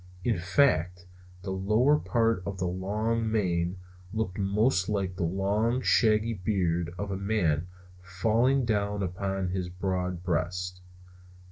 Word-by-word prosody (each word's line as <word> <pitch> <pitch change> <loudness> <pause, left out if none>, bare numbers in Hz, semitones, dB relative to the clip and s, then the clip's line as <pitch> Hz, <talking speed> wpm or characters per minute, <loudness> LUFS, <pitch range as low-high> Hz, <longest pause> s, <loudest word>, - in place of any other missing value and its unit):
In 115 -6 +1
fact, 90 - +2 0.4
the 95 - -4
lower 105 +9 +3
parts 115 -4 +1
of 100 -1 -4
the 95 - -2
long 105 +5 -1
mane 90 -4 0 0.3
looked 110 -3 -3
most 100 0 +2
like 95 -3 -1
the - - -5
long 100 +7 +1
shaggy 110 0 +3
beard 90 -4 -1
of 100 +1 -4
a 95 - -2
man 90 -6 0 0.3
falling 115 +9 +1
down 105 -2 0
upon 95 +1 -2
his 90 -1 -3
broad 90 -1 -3
breast. 90 +1 -2
95 Hz, 130 wpm, -28 LUFS, 90-110 Hz, 0.4 s, lower